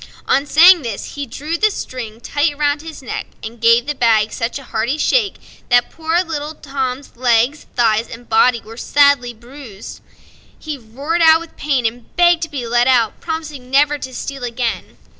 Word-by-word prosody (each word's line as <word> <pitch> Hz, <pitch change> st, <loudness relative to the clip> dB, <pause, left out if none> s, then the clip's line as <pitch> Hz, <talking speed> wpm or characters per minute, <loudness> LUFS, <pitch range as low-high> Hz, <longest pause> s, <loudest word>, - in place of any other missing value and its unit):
On 275 Hz, +2 st, +2 dB
saying 345 Hz, +4 st, +7 dB
this, 230 Hz, -6 st, -6 dB
he 285 Hz, -1 st, -5 dB
drew 305 Hz, +8 st, -4 dB
the 430 Hz, -, +4 dB
string 235 Hz, -, -7 dB
tight 290 Hz, +3 st, -1 dB
round 290 Hz, 0 st, 0 dB
his 320 Hz, -3 st, -10 dB
neck, 250 Hz, -, -5 dB, 0.2 s
and 225 Hz, +1 st, -8 dB
gave 230 Hz, +1 st, +4 dB
the 295 Hz, -, -2 dB
bag 225 Hz, -5 st, +2 dB
such 230 Hz, +2 st, -3 dB
a 275 Hz, -, -10 dB
hearty 240 Hz, +4 st, -2 dB
shake 425 Hz, +4 st, +1 dB, 0.3 s
that 245 Hz, -1 st, +3 dB
poor 330 Hz, +2 st, 0 dB
little 310 Hz, -2 st, -5 dB
Tom's 270 Hz, -2 st, -5 dB
legs, 245 Hz, +4 st, +1 dB
thighs 225 Hz, -1 st, +2 dB
and 235 Hz, +1 st, -11 dB
body 235 Hz, +2 st, +3 dB
were 225 Hz, +1 st, -12 dB
sadly 280 Hz, -3 st, +3 dB
bruised. 235 Hz, -2 st, -12 dB, 0.6 s
He 310 Hz, -2 st, -6 dB
roared 275 Hz, +8 st, -3 dB
out 320 Hz, 0 st, +7 dB
with 335 Hz, 0 st, -12 dB
pain 275 Hz, -5 st, -1 dB
and 230 Hz, +1 st, -4 dB
begged 345 Hz, -1 st, +4 dB
to 325 Hz, -, -3 dB
be 275 Hz, -5 st, -5 dB
let 240 Hz, +1 st, +2 dB
out, 235 Hz, -4 st, +2 dB
promising 310 Hz, -6 st, -6 dB
never 290 Hz, +2 st, +3 dB
to 260 Hz, -, -7 dB
steal 275 Hz, +1 st, -6 dB
again. 240 Hz, -1 st, -3 dB
270 Hz, 180 wpm, -18 LUFS, 235-300 Hz, 0.6 s, saying